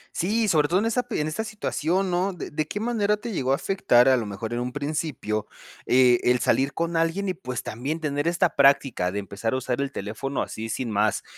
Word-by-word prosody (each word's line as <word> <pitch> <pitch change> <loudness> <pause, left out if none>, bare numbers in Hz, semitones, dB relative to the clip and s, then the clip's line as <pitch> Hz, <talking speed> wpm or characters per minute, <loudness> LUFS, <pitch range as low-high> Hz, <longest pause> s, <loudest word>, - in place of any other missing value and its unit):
Sí, 215 +5 +1
sobre 155 -6 +3
todo 175 - +2
en 205 - +1
esa 230 +2 +1
p 245 -1 -4
en 150 - 0
esa 155 +8 -2
situación, 190 -4 -1
¿no?, 185 +3 0
de 175 - -7
de 150 0 -2
qué 205 - -4
manera 210 -2 +1
te 225 +3 -6
llegó 135 -9 -1
a - - +5
afectar 140 -8 +3
a 130 - +6
lo 115 -4 -2
mejor 110 +3 -5
en 120 - -1
un 125 +1 -3
principio, 145 -7 -3 0.4
eh, 125 -1 +5
el 125 0 +4
salir 135 +3 +1
con 170 0 -1
alguien 165 +5 0
y, - - 0
pues, 125 -8 -5
también 135 +9 -4
tener 145 0 -1
esta 175 0 +1
práctica 135 -9 +3
de 100 - -4
empezar 100 +3 -3
a - - +1
usar 130 0 -2
el 140 - -2
teléfono 115 +7 -3
así 110 +1 -6
sin 120 0 -3
más. 105 +1 +1
145 Hz, 230 wpm, -25 LUFS, 125-180 Hz, 0.4 s, a